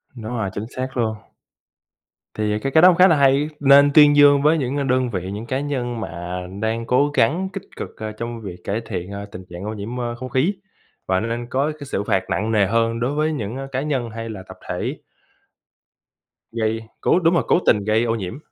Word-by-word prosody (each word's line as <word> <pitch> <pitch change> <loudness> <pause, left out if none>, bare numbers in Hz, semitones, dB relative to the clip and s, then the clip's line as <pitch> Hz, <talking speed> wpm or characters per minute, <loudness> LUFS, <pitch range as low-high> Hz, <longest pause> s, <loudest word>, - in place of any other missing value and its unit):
Đúng 110 -1 -7
rồi, 110 -5 -2
chính 105 - -4
xác 130 0 -4
luôn. 110 -2 0 1.2
Thì, 105 -1 -1
à, - - 0
cái 135 - -2
cái 160 - +5
đó 180 - +10
cũng 180 - +4
khá 185 +2 +7
là 165 - +4
hay, 140 +1 +3
nên 140 0 +6
tuyên 150 -1 +7
dương 145 -1 +6
với 155 +2 +4
những, 135 -1 -2
à, 140 - 0
đơn 130 -1 +1
vị, 95 -3 -4
những 105 +3 -6
cá 130 +2 -1
nhân 125 -5 -3
mà 90 -1 -5 0.2
đang 115 +1 -2
cố 140 +4 +2
gắng 170 +12 +2
kích 195 - -5
cực, - - -7
ơ, 110 0 -5
trong 115 +2 -6
việc 95 -4 -7
cải 105 +3 -2
thiện, 90 +2 -5
ơ, 100 0 -6
tình 95 - -8
trạng 85 +2 -7
ô 105 - -3
nhiễm, 110 +4 -5
ơ, 120 -1 -3
không 130 +2 -7
khí 135 +11 +1 0.5
và 95 0 +2
nên 115 +1 -3
có 140 +4 0
cái 145 - -8
sự 100 - -2
phạt 95 - +1
nặng 110 +2 -1
nề 105 -3 +3
hơn 115 +2 0
đối 125 +4 -1
với 155 +1 +1
những 115 -5 -4 0.2
cá 130 +1 -1
nhân 135 -6 -2
hay 115 +1 -6
là 100 -4 -7
tập - - -10
thể - - -3 1.5
gây, 110 -1 -1 0.2
cố - - +3
đúng 170 -1 +3
rồi, 175 - +2
cố - - +4
tình 105 -2 +3
gây 110 +2 +2
ô 115 -1 0
nhiễm. 100 +1 -5
120 Hz, 230 wpm, -21 LUFS, 110-140 Hz, 1.5 s, đó